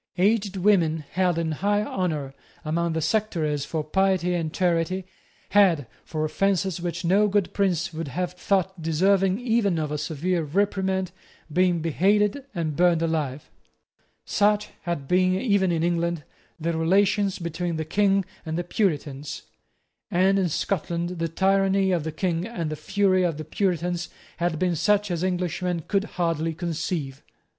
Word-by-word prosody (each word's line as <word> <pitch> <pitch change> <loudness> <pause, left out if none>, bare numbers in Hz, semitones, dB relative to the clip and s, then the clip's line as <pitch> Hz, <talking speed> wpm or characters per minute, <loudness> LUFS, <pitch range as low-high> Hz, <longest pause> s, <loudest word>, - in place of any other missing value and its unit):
Aged 200 +1 +2
women 170 -6 +2
held 180 -2 +1
in 165 -1 -1
high 205 +6 +1
honour 155 -10 -2 0.3
among 170 +2 0
the 160 -1 -1
sectaries 160 -7 0
for 155 -1 -2
piety 185 +2 +1
and 165 -3 -1
charity 180 +1 0 0.4
had, 185 -9 +4 0.2
for 155 -1 -2
offences 190 +2 0
which 175 0 -3
no 200 +5 +4
good 200 -2 0
prince 180 -4 0
would 160 0 -4
have 180 +5 -3
thought 190 0 -1
deserving 190 +5 +2
even 225 -7 +1
of 155 -2 -2
a 150 - -2
severe 165 +4 -1
reprimand, 190 +3 0 0.4
been 180 -1 +2
beheaded 205 - +2
and 160 -4 -2
burned 170 -1 +3
alive. 150 -4 -2 0.7
Such 210 0 +2 0.2
had 170 -6 -3
been, 185 +2 +3
even 200 -6 +2
in 165 -1 0
England, 170 -2 0 0.4
the 165 +1 -1
relations 195 +4 +2
between 170 0 -3
the 160 0 -3
King 195 +3 +2 0.2
and 160 0 -3
the 175 - -1
Puritans; 150 -7 -2 0.7
and 190 +3 +3
in 185 -2 +1
Scotland 170 +1 -1
the 165 - 0
tyranny 195 +2 +2
of 175 -4 +1
the 160 - -2
King 170 +2 -1
and 170 -9 -4
the - - -2
fury 190 +4 +1
of 170 -4 0
the 155 - -6
Puritans 175 0 -1 0.3
had 170 -1 0
been 180 +1 +1
such 205 +3 +2
as 170 0 -1
Englishmen 180 -1 -1
could 200 0 +1
hardly 165 -4 -1
conceive. 160 -5 -3
175 Hz, 150 wpm, -25 LUFS, 160-195 Hz, 0.7 s, had